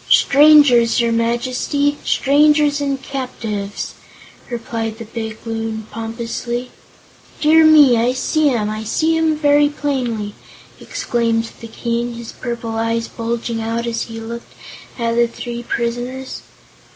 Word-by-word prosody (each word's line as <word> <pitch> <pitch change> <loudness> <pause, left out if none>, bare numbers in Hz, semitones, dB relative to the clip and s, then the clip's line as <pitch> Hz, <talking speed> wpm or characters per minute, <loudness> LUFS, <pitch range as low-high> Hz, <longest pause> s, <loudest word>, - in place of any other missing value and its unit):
"Strangers, 280 -6 +6
your 235 -1 +2
Majesty 250 +5 0
strangers 295 +1 +3
and 275 -1 -1
captives," 220 -7 -5 0.6
replied 225 -2 -4
the 230 - -8
big 220 0 -6
Loon, 225 -1 -4
pompously. 235 +2 -4 0.7
"Dear 320 +1 +5
me! 300 -5 +7
I 235 +2 +2
see 305 +3 +1
'em. 225 -5 0
I 215 +1 -4
see 320 +9 +1
'em 320 -1 +1
very 290 -1 +4
plainly," 245 -8 -2 0.5
exclaimed 230 -1 -1
the 230 - -8
King, 235 +1 -3
his 235 -1 -8
purple 235 -2 -5
eyes 230 0 -1
bulging 230 0 -3
out 230 +1 -2
as 230 -1 -2
he 225 -1 -8
looked 235 +1 -8 0.4
at 230 -2 0
the 235 0 +4
three 240 0 -6
prisoners. 245 +3 -4
235 Hz, 125 wpm, -18 LUFS, 230-275 Hz, 0.7 s, me